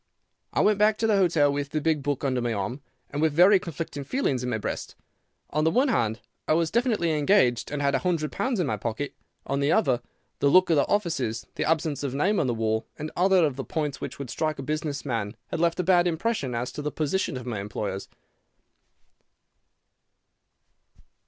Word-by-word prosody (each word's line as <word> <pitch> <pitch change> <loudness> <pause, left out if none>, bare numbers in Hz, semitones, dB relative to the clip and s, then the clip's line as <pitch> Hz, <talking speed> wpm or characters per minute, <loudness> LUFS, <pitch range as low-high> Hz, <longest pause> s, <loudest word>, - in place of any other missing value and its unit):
"I - - +1
went 210 -1 +3
back 210 0 +4
to 225 - 0
the 215 -2 +3
hotel 160 -7 +3
with 140 0 -3
the 155 - -1
big 155 -1 +1
book 145 0 -2
under 130 -3 0
my 120 -1 -1
arm, 110 +7 -3 0.3
and 145 - -2
with 160 -2 +2
very 185 +5 +6
conflicting 165 -4 -5
feelings 140 - -1
in 125 - -2
my 115 - 0
breast. 105 - -5 0.6
On 155 +1 +1
the 160 - +4
one 255 - +2
hand, 115 - 0 0.3
I - - +3
was 165 0 +1
definitely 225 -7 +1
engaged 145 - +3
and 145 0 -3
had 140 0 +2
a 135 - +2
hundred 165 -4 -1
pounds 235 +2 -1
in 175 - +2
my 135 - -1
pocket; 120 +5 -4 0.3
on 140 - -1
the 140 +2 +2
other, 130 - +2 0.4
the 140 - +3
look 185 +3 +5
of - - +5
the 140 - +3
offices, 135 - -1
the - - -1
absence 155 -3 0
of 135 -2 -3
name 195 +9 +2
on 140 - +1
the 120 - +1
wall, 110 0 -1
and 155 +1 -5
other 185 -1 +4
of 140 -4 -2
the 135 - -3
points 150 -2 -3
which - - -5
would 140 -4 -6
strike 155 -2 -1
a 135 - -5
business 150 0 -3
man 115 -4 -3
had - - -3
left 170 +1 +1
a - - +2
bad 180 0 +4
impression 165 - -1
as 120 +1 -2
to - - -6
the 150 0 -3
position 155 -1 -1
of 125 - -7
my 115 -5 -3
employers. 100 -1 -4
150 Hz, 210 wpm, -26 LUFS, 130-175 Hz, 0.6 s, very